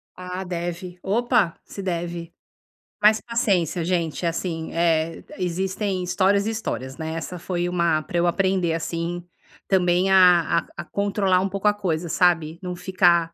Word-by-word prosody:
Ah, 180 +1 -5
deve, 175 0 -5
opa, 220 -3 +1
se 200 - -8
deve. 170 -2 -4 0.7
Mas 215 +1 +5
paciência, 195 -8 0
gente, 170 -1 -1
assim, 165 -1 -2
eh, 165 -1 +1
existem 190 +1 -2
histórias 200 +3 +2
e - - +1
histórias, 135 - -4
né, 160 0 -4
essa 180 +2 -5
foi 175 0 -2
um 180 - -4 0.3
para 175 - -3
eu 175 0 +3
aprender, 185 -2 +1
assim, 170 +1 -3 0.4
também 180 0 +2
a 175 -3 +5
a - - -10
a - - -4
controlar 200 -2 +1
um 195 - -1
pouco 200 +2 -1
a 205 - +5
coisa, 175 -5 -2
sabe. 170 -3 +2
Não 180 -1 -4
ficar 175 -3 +2
180 Hz, 155 wpm, -23 LUFS, 170-190 Hz, 0.7 s, Mas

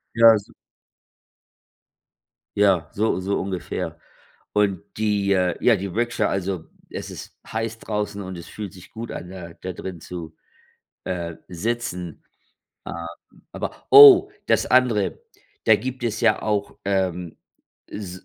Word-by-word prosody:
Ja, 115 -1 +8
s 100 - -9 2.1
Ja, 90 -6 +3
so 105 -2 0
so 95 +2 -1
ungefähr. 95 -2 -4 0.5
Und 100 -4 +2 0.2
die, 105 -2 +1
äh 90 -2 +2
ja, 120 - +6
die 100 -1 -4
Ricksha. 115 +2 0
Also, 95 -3 -2 0.2
es - - -6
ist - - -10
heiß 115 0 -3
draußen 105 -2 -3
und 95 0 -6
es 85 - -9
fühlt 105 -4 -7
sich 90 -1 -14
gut 115 +1 -7
an, 90 - -7
da 90 -3 -9
da 95 - -7
drin 90 -1 -7
zu, 80 -2 -8 0.7
äh, 85 -2 -4
sitzen. 90 -3 -4 0.6
Ähm, 85 0 -6 0.5
aber - - -6
oh, 405 -2 +10 0.2
das - - +3
andere. 120 -6 +2 0.4
Da 110 - +6
gibt 130 0 -5
es 110 -2 -1
ja - - +3
auch, 105 -2 -1
ähm, 95 -3 -1 0.5
s 95 -3 -7
100 Hz, 135 wpm, -23 LUFS, 90-110 Hz, 2.1 s, oh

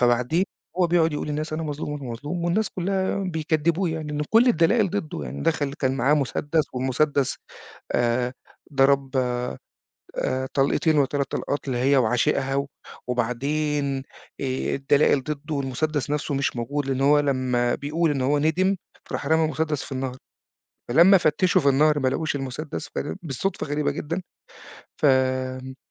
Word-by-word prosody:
فبعدين 125 +8 +2 0.3
هو 180 - +4
بيقعد 165 -2 +3
يقول 150 - -3
للناس 155 +1 -3
"أنا 160 +1 -2
مظلوم، 150 -1 -4
أنا 135 -4 -6
مظلوم." 150 +9 -4
والناس 195 +6 +1
كلّها 190 +1 -1
بيكدبّوه، 165 0 0
يعني 160 -1 -4
لإن 150 0 -1
كل 230 +3 +6
الدلائل 195 +1 +3
ضده، 195 -6 -3
يعني 70 +3 -6
دخل 140 - 0
كان 135 -2 -1
معاه 135 +5 +3
مسدس 145 +2 0
والمسدس 130 +2 0 0.6
آآ 120 +1 +1 0.4
ضرب 135 0 +3 1.0
آآ 130 0 -1
طلقتين 145 +3 +2
والّا 140 -2 +4
3 140 -1 -2
طلقات 145 -1 -3
لهي 130 +2 +2
وعشيقها، 135 +3 +1 0.4
وبعدين 135 +3 -1 0.4
آآ 130 -1 -1
الدلائل 140 0 +3
ضده 150 0 -4
والمسدس 145 +1 -1
نفسه 150 -1 -1
مش 135 -2 -1
موجود، 140 +4 -2
لإن 135 -1 -1
هو 145 +2 +5
لمّا 130 -4 +1
بيقول 155 +3 0
إن 135 -3 0
هو 145 +3 +2
ندم 180 +6 +2 0.4
راح - - -3
رمى 160 +2 +3
المسدس 155 -1 -1
في - - -9
النهر، 130 -1 -3 0.7
فلما 175 +9 +7
فتشوا 180 +3 +2
في 140 - +4
النهر 150 +2 +4
ما 130 - +1
لقوش 150 +3 -1
المسدس، 135 +3 -5
فل 145 - -3
بالصدفة 155 +3 -3
غريبة 145 0 0
جدًا، 165 +5 -3 0.8
فامم 130 -1 +1
145 Hz, 150 wpm, -24 LUFS, 130-155 Hz, 1.0 s, فلما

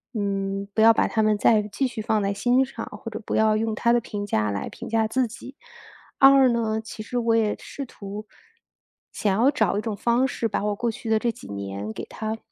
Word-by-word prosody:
嗯， 195 -1 -2
不 220 - +3
要 225 +1 +8
把 - - +2
它 220 - +1
们 215 -1 +3
再 215 -1 +4
继 215 +6 -2
续 235 -3 -7
放 215 0 +1
在 200 - 0
心 245 +6 +3
上， 245 -4 -7 0.2
或 230 - -4
者 220 - -5
不 - - -4
要 215 0 +3
用 220 0 -1
他 235 +2 +2
的 240 - +4
评 205 -2 -5
价 105 - 0
来 100 - -3
评 - - -9
价 225 -1 +2
自 255 +3 +1
己。 250 +4 -11 0.6
二 270 -1 +7
呢， 225 -2 0
其 220 0 -9
实 245 +3 -4
我 230 -1 +2
也 220 -2 +2
试 280 - -7
图， 210 -2 -8 0.8
想 200 -3 0
要 265 - +6
找 220 -9 +1
一 - - -2
种 215 -2 -4
方 240 +5 +2
式 240 -2 -2
把 205 - -2
我 210 -1 0
过 235 +2 -1
去 225 +1 -7
的 220 - +4
这 235 +1 0
几 225 - -13
年 100 +1 -5
给 - - -6
它 220 0 -5
220 Hz, 250 characters per minute, -24 LUFS, 205-235 Hz, 0.8 s, 要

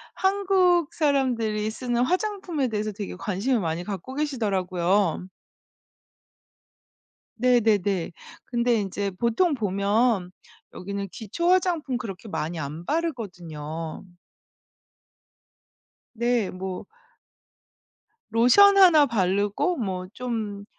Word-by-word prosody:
한국 375 -4 +2
사람들이 245 -8 0
쓰는 245 +1 -1
화장품에 365 -4 -1
대해서 215 -1 -2
되게 205 -2 -6
관심을 210 +5 -1
많이 165 0 -2
갖고 205 +6 -6
계시더라고요. 195 - 0 2.1
네네네. 210 -7 +2 0.3
근데 240 -1 +1
인제 200 0 -3
보통 235 - +1
보면 200 -2 +1 0.4
여기는 200 +1 -5
기초 340 - -2
화장품 345 -8 +1
그렇게 215 -3 -7
많이 160 -2 -3
안 150 +4 -6
바르거든요. 170 - -4 2.1
네 235 -3 +1
뭐 185 0 -6 1.5
로션 395 - +6
하나 345 -6 +7
바르고 205 - 0
뭐 185 -6 -3
좀 220 -5 -4
220 Hz, 205 characters per minute, -25 LUFS, 190-270 Hz, 2.1 s, 하나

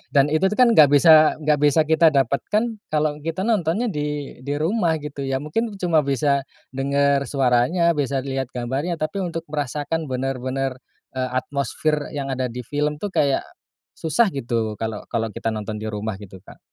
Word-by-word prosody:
Dan 140 0 +5
itu 155 +5 +3
tuh - - -1
kan 250 -1 +6
nggak 150 -6 +8
bisa 155 +1 +7
nggak 150 -1 +2
bisa 150 +2 +4
kita 160 +1 +4
dapatkan 140 - +1 0.3
kalau 150 -1 0
kita 165 +4 -3
nontonnya 210 +1 +1
di 150 -4 -4
di 140 +2 -3
rumah 170 0 +1
gitu 145 -1 -7
ya, 135 0 0
mungkin 225 +10 -1
cuma 170 -3 +3
bisa 140 0 +1 0.3
denger 140 +1 +1
suaranya, 135 +6 +2
bisa 140 -2 0
lihat 135 -1 -3
gambarnya, 135 +8 -2
tapi 155 +5 -2
untuk 165 -1 -4
merasakan 150 +2 -2
bener-bener, 130 0 -2 0.4
eee, 130 -1 -2
atmosfer 145 +2 -2
yang 140 -1 -3
ada 130 0 -1
di 125 +1 -6
film 150 +2 -1
tuh 205 +2 -4
kayak 140 -2 +2 0.5
susah 215 +9 +2
gitu, 115 -5 -2
kalau 110 -2 -3
kalau 115 -1 0
kita 115 - -3
nonton 110 0 -4
di - - -8
rumah, 105 -1 -3
gitu, 95 -2 -11
Kak. - - -15
145 Hz, 170 wpm, -22 LUFS, 130-160 Hz, 0.5 s, nggak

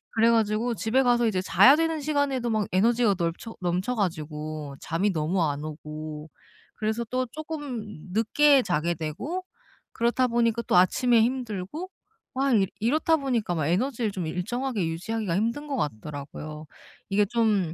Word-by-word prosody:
그래 225 +1 +5
가지고 225 +1 +1
집에 225 +5 +1
가서 240 -1 +3
이제 190 -4 0
자야 195 +9 +6
되는 325 -1 0
시간에도 280 -4 0
막 215 -2 0
에너지가 225 +2 +3
널쳐 170 +6 -3
넘쳐 180 +7 -1
가지고 155 - -3
잠이 180 +5 0
너무 165 +4 0
안 145 -1 -1
오고 155 0 -7 0.5
그래서 220 +2 -1
또 255 0 0
쪼끔 295 -7 -5 0.3
늦게 275 +6 +4
자게 175 -2 0
되고 185 - -4 0.5
그렇다 240 +2 +2
보니까 235 -1 +1
또 - - +2
아침에 235 +6 +4
힘들고 240 - -2 0.5
막 270 0 +2
이 195 -3 +3
이렇다 305 +8 +2
보니까 220 - -1
에너지를 225 +4 0
좀 185 -3 -4
일정하게 210 +4 -2
유지하기가 185 +3 -2
힘든 235 +8 -1
것 280 - -2
같더라고요. 150 - -5 0.4
이게 205 +1 +3
좀 210 -6 +1
215 Hz, 325 characters per minute, -26 LUFS, 170-250 Hz, 0.5 s, 자야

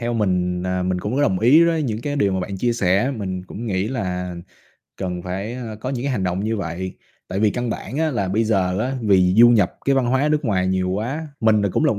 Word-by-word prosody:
Theo 120 0 -2
mình, 90 -4 0
à, 90 0 -1
mình 90 0 -1
cũng 105 +7 -3
có 145 - +2
đồng 95 -10 +2
ý 140 - +6
đối 165 -2 +1
những 110 -5 -2
cái 145 +1 -2
điều 100 -8 +2
mà 95 - -1
bạn 95 +1 -4
chia 120 +5 +1
sẻ, 100 +3 +1
mình 95 -3 -4
cũng 110 +5 -7
nghĩ 95 -1 -1
là 90 -7 -3 0.6
cần 90 -2 -4
phải, 95 +6 -4
a, 115 -4 -6
có 125 - -4
những 130 -1 -3
cái 140 - 0
hành 95 -6 -1
động 90 +2 -1
như 110 +1 -1
vậy, 95 0 -4 0.3
tại 95 +2 -2
vì 110 - +4
căn 120 +1 -2
bản 130 - -5
á 160 -1 +1
là 100 -7 -1
bây 110 +4 +1
giờ 95 -3 +1
á 130 +4 -1
vì 95 -3 +4
du 120 +2 +8
nhập 100 -6 +3
cái 135 - +3
văn 130 -2 +2
hóa 130 +4 +2
nước 150 -1 0
ngoài 95 -6 +1
nhiều 95 0 0
quá. 130 +11 -3
Mình 110 -2 +3
là 100 - +2
cũng - - +1
là 150 - +4
một 100 - -4
105 Hz, 270 wpm, -21 LUFS, 95-125 Hz, 0.6 s, du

